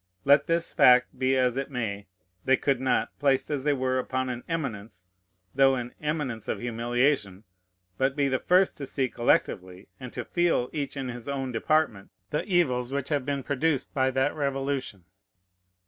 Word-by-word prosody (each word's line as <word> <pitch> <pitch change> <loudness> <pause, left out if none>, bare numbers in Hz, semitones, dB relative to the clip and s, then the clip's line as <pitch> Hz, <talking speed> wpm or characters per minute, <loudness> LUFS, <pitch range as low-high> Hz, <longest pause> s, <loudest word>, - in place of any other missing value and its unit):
Let 140 +1 +5
this 170 0 0
fact 125 0 +5
be 130 0 +2
as 125 -1 +1
it 135 +1 -3
may, 105 -6 -4 0.4
they 135 0 +3
could 135 -3 0
not, 130 - +1
placed 135 +1 +1
as 140 -3 -2
they 145 0 +2
were 130 -1 0
upon 130 0 -2
an 125 -1 -5
eminence, 110 - -5 0.5
though 135 0 +4
an 125 -1 -5
eminence 150 -7 -3
of - - -1
humiliation, 120 -3 0 0.6
but 135 0 +1
be 140 -2 +1
the 130 -1 0
first 185 +1 +3
to 140 - -5
see 130 0 -1
collectively, 95 -6 0
and 130 -2 -8
to - - -5
feel 175 -8 +1
each 145 -2 -3
in 135 -2 -3
his 120 0 -8
own 135 -2 -3
department, 115 -4 0 0.2
the 150 - -1
evils 130 - +1
which 140 0 -3
have 145 -4 -1
been 140 -1 -2
produced 140 0 -1
by 130 -2 +2
that 130 +2 0
Revolution. 135 - -3
130 Hz, 175 wpm, -27 LUFS, 125-140 Hz, 0.6 s, Let